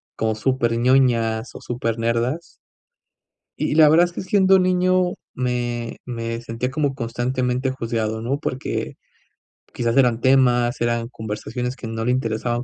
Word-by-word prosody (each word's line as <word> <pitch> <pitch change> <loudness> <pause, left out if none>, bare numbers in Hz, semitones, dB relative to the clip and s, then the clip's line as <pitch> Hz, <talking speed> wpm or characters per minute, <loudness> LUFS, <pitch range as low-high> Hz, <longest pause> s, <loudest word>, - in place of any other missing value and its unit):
como 110 -1 -1
súper 120 0 0
ñoñas, 120 -2 +2
o - - -9
súper 115 -2 -3
nerdas 120 +8 -2 1.0
y - - 0
la 155 -2 +7
verdad, 170 +3 +6
es 175 - -7
que - - -4
siendo 190 0 +4
niño, 185 0 +2 0.2
me 120 -2 -2
me 115 -1 -4
sentía 120 +2 -4
como 145 -2 -1
constantemente 125 +1 -1
juzgado, 115 -3 -2
¿no? 135 +5 -2
Porque, 130 -3 -3 0.8
quizás 120 -1 -1
eran 125 -4 +4
temas, 125 -2 +3
eran 120 0 0
conversaciones, 125 +3 -5
que 115 - -7
no 115 0 -4
le 125 - +1
interesaban 120 0 -1
125 Hz, 145 wpm, -22 LUFS, 115-135 Hz, 1.0 s, la